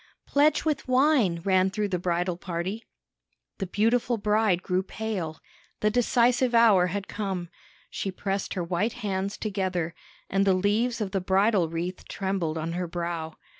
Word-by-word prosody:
"Pledge 290 +2 +3
with 300 -4 -1
wine!" 255 - +3
ran 190 -1 +3
through 205 +1 -2
the 180 -2 -1
bridal 175 0 0
party. 180 +5 -4 0.8
The 195 - -2
beautiful 230 +5 +1
bride 210 -3 +2
grew 185 0 +1
pale; 190 -5 -4 0.4
the 210 - +3
decisive 245 +1 +3
hour 210 -6 +6
had 195 +2 -4
come. 190 -5 -4 0.4
She 195 - -3
pressed 195 +1 -3
her 180 - -1
white 180 +6 -1
hands 195 0 -2
together, 185 -5 -2 0.3
and 195 +1 +1
the 195 -1 +4
leaves 220 +5 +1
of 200 -3 -2
the 195 - -1
bridal 190 -1 +2
wreath 170 +3 -4
trembled 190 -5 -2
on 160 +1 -3
her 180 0 -2
brow. 170 -2 -4
195 Hz, 155 wpm, -27 LUFS, 180-220 Hz, 0.8 s, hour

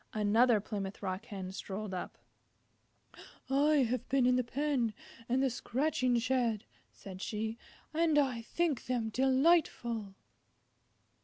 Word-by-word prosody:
Another 220 +2 +4
Plymouth 200 -1 -5
Rock 190 +3 -3
Hen 195 -5 -6
strolled 200 +1 -5
up. 180 - -5 1.3
"I 285 0 +4
have 250 +2 -3
been 265 -1 +3
in 250 0 +4
the 255 - +2
pen 250 -3 -1 0.3
and 260 +2 +2
the 270 - +3
scratching 255 0 0
shed," 235 -3 0 0.3
said 190 -1 -10
she, 220 +2 -3 0.3
"and 320 -1 +2
I 260 -5 +2
think 310 +3 -1
them 240 -3 -1
delightful." 260 - +2
240 Hz, 125 wpm, -32 LUFS, 210-270 Hz, 1.3 s, Another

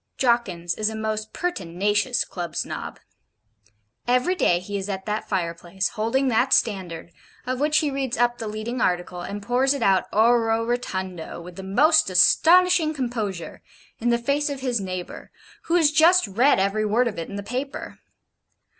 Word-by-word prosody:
Jawkins 195 -9 0
is 215 0 -1
a 220 - -6
most 215 0 -3
pertinacious 205 - -1
Club 175 -2 -6
Snob. - - -5 1.1
Every 250 +8 +2
day 180 - +2
he 200 +3 -7
is 195 0 -4
at 190 -1 -4
that 210 0 -3
fireplace, 175 +1 -2
holding 240 +5 0
that 245 +3 +2
STANDARD, 180 -6 -1 0.3
of 255 0 -3
which 300 +1 +2
he 295 -2 +1
reads 270 -2 -2
up 240 0 +1
the 225 - -4
leading 215 +3 -4
article, 180 0 -1
and 200 +3 -6
pours 255 +5 +2
it 270 - -3
out 190 -3 +3
ORE 235 +3 +4 0.2
ROTUNDO, 190 -9 -4
with 175 +1 -11
the 190 - -7
most 285 +10 +3
astonishing 335 - +4
composure, 220 - -4 0.4
in 240 - 0
the 235 - +3
face 280 +5 0
of 280 -2 -5
his 245 -5 -1
neighbour, 185 -2 -6 0.4
who 335 - 0
has 320 -4 +4
just 330 +3 +5
read 240 +9 +3
every 200 +3 0
word 225 +4 +2
of 210 -6 -4
it 165 - -6
in 200 - -7
the 200 - -5
paper. 255 +6 -5
220 Hz, 170 wpm, -23 LUFS, 190-265 Hz, 1.1 s, just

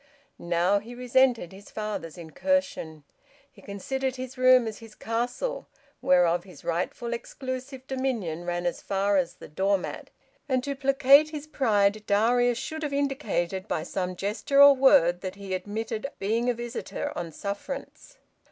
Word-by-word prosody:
Now, 175 +4 +2
he 235 +4 -10
resented 250 -5 +2
his 200 +1 -13
father's 210 -6 -5
incursion. 170 - -2 0.5
He 215 - -18
considered 260 +7 -3
his 255 0 -7
room 255 -1 +5
as 220 -1 -5
his 225 -2 -13
castle, 245 - -3 0.3
whereof 175 -1 +3
his 185 -1 -15
rightful 180 +8 -2
exclusive 260 +2 -6
dominion 240 -12 -2
ran 175 0 -2
as 175 - -2
far 200 +1 +1
as 180 -2 0
the - - -12
door 195 +6 +1
mat; 185 - -7 0.4
and 255 -1 +1
to 280 0 -3
placate 275 +2 +5
his 300 -1 -6
pride 215 -8 +1
Darius 240 +4 +3
should 315 +5 -5
have 295 -2 -3
indicated 265 - -1
by 155 - -2
some 180 +1 -3
gesture 210 +9 0
or 280 0 +10
word 175 -10 +5
that 185 -1 -5
he 200 -1 -6
admitted 215 +6 -3
being 225 +5 0
a 245 - +1
visitor 240 +4 -5
on 170 -2 -4
sufferance. 205 - -7
225 Hz, 150 wpm, -27 LUFS, 190-265 Hz, 0.5 s, or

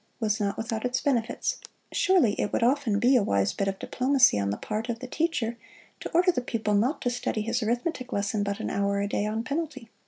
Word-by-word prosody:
was 215 -2 0
not 200 -1 -1
without 225 -1 -3
its 250 0 0
benefits. 250 - 0 0.3
Surely 355 - +3
it 205 - -1
would - - 0
often 250 -4 +2
be 245 +5 +4
a 245 - +5
wise 100 - +1
bit 200 - -1
of 195 0 -2
diplomacy 255 - +3
on 100 0 0
the 100 - -2
part 220 +2 -4
of 235 - -1
the 255 - -8
teacher 250 -5 -1 0.4
to - - -5
order 360 +2 +4
the 250 - -2
pupil 225 -3 -2
not 235 +9 +2
to 245 - +2
study 240 -2 -2
his 230 +3 -1
arithmetic 245 +4 -2
lesson 205 +1 -1
but 200 +1 -2
an - - -3
hour 200 0 0
a 200 - 0
day, 205 0 -1
on 220 +2 -2
penalty. 290 -4 -4
230 Hz, 225 wpm, -27 LUFS, 205-255 Hz, 0.4 s, a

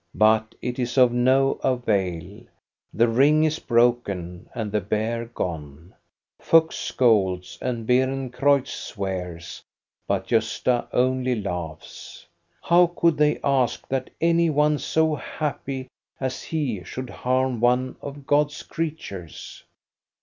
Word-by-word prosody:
But 110 +1 +3
it 125 +1 -3
is 125 +1 -2
of 125 -2 +6
no 130 +3 +2
avail; 100 -7 -1 0.5
the 115 +3 +3
ring 140 +7 +4
is 155 0 0
broken, 110 -8 0
and 110 -3 -3
the 105 0 0
bear 110 +4 -2
gone. 80 -7 -6 0.5
Fuchs 165 0 +4
scolds, 95 -7 +1
and 120 -3 -3
Beerencreutz 130 +1 +1
swears, 90 -4 -5 0.5
but - - -1
Gosta 125 -1 0
only 130 -1 +1
laughs. 85 -5 -7 0.4
How 175 +1 +5
could 170 -2 +2
they 150 0 +2
ask 135 -4 +1
that 130 -1 -2
any 170 0 +3
one 150 0 +2
so 160 -1 +1
happy 140 -3 -4 0.3
as 130 -1 -3
he 135 - -3
should 130 +7 -7
harm 130 -1 0
one 125 +2 +2
of 140 0 -8
God's 145 +1 +1
creatures? 150 - -6
125 Hz, 120 wpm, -24 LUFS, 105-140 Hz, 0.5 s, of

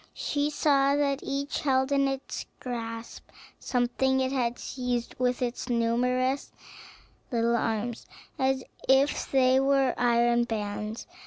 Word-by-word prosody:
She 290 0 -1
saw 280 -2 +3
that 280 -1 +1
each 280 +1 -3
held 265 -1 +1
in 275 -1 +3
its 270 0 -4
grasp 230 -2 -6 0.3
something 265 +2 +1
it 260 0 0
had 245 -3 0
seized 250 -2 -3
with 250 0 +1
its 245 +1 -3
numerous 250 +3 +1 0.8
little 235 -1 +2
arms, 225 0 -2 0.3
as 265 0 +1 0.3
if 270 +2 +3
they 260 -1 +4
were 270 -1 +3
iron 240 0 +3
bands. 210 -1 -4
255 Hz, 125 wpm, -28 LUFS, 235-270 Hz, 0.8 s, they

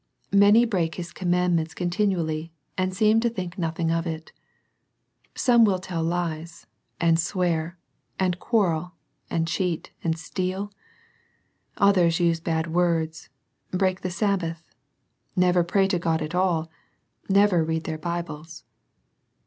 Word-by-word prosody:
Many 205 +4 +6
break 175 -8 -1
His 170 -1 -6
commandments 175 -3 0
contin 180 +4 +1
ually, 160 -1 -3 0.3
and 185 0 0
seem 215 +4 +3
to 235 +1 +1
think 185 -6 -5
nothing 165 0 -1
of 165 +1 0
it 160 -1 -5 1.0
Some 240 -3 +5
will 200 -4 +4
tell 180 -2 -4
lies, 165 0 -3 0.3
and 165 -1 +3
swear, 175 -1 -1 0.4
and 180 -2 0
quarrel, 180 -7 0 0.4
and 165 0 0
cheat, 175 -1 -2
and 160 -1 0
steal. 185 +4 -3 1.1
Others 185 -5 +4
use 170 -1 +2
bad 160 0 -2
words, 165 -2 0 0.4
break 185 0 0
the 185 - -2
Sabbath, 175 -4 -1 0.7
never 180 -1 +4
pray 195 +3 +2
to 180 -3 +1
God 165 -2 0
at 155 +3 -5
all, 175 -3 +1 0.6
never 195 -3 +4
read 160 0 -1
their 160 -1 -4
Bibles. 165 -2 -5
175 Hz, 130 wpm, -25 LUFS, 165-185 Hz, 1.1 s, Many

